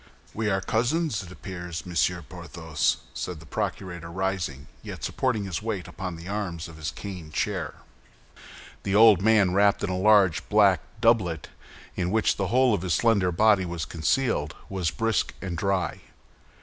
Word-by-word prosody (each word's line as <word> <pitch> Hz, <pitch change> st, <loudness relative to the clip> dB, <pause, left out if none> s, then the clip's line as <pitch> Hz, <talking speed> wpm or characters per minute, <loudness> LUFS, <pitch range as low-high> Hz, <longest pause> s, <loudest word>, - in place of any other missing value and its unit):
"We 110 Hz, -1 st, -1 dB
are 95 Hz, -1 st, +1 dB
cousins, 125 Hz, -, 0 dB
it 95 Hz, -2 st, -10 dB
appears, 90 Hz, -3 st, -7 dB
Monsieur 90 Hz, 0 st, 0 dB
Porthos?" 80 Hz, -1 st, -2 dB, 0.2 s
said 90 Hz, -3 st, -5 dB
the 80 Hz, -, -14 dB
procurator, 85 Hz, 0 st, -4 dB
rising, 90 Hz, -6 st, -2 dB, 0.2 s
yet -, -, -8 dB
supporting 125 Hz, -6 st, 0 dB
his 95 Hz, -3 st, -3 dB
weight 105 Hz, -4 st, -3 dB
upon 90 Hz, -2 st, -5 dB
the 85 Hz, +2 st, -10 dB
arms 95 Hz, -5 st, -3 dB
of 85 Hz, -2 st, -12 dB
his 80 Hz, -1 st, -3 dB
cane 90 Hz, -6 st, -8 dB
chair. -, -, -2 dB, 1.1 s
The 100 Hz, -, -1 dB
old 110 Hz, -3 st, +7 dB
man, 105 Hz, -3 st, +4 dB
wrapped 100 Hz, +1 st, +3 dB
in 100 Hz, -, -1 dB
a -, -, -1 dB
large 95 Hz, -3 st, +4 dB
black 100 Hz, -3 st, +5 dB, 0.2 s
doublet, 100 Hz, -9 st, +2 dB, 0.5 s
in 90 Hz, -1 st, -1 dB
which 110 Hz, +2 st, +2 dB
the 100 Hz, -, -1 dB
whole 125 Hz, +1 st, +4 dB
of 100 Hz, -, 0 dB
his 90 Hz, -3 st, 0 dB
slender 100 Hz, -6 st, +3 dB
body 105 Hz, +2 st, +4 dB
was 85 Hz, -4 st, -4 dB
concealed, 80 Hz, -, 0 dB
was 95 Hz, -4 st, -1 dB
brisk 115 Hz, +4 st, -1 dB
and 95 Hz, -3 st, -4 dB
dry. 95 Hz, +2 st, -1 dB
95 Hz, 160 wpm, -26 LUFS, 85-105 Hz, 1.1 s, old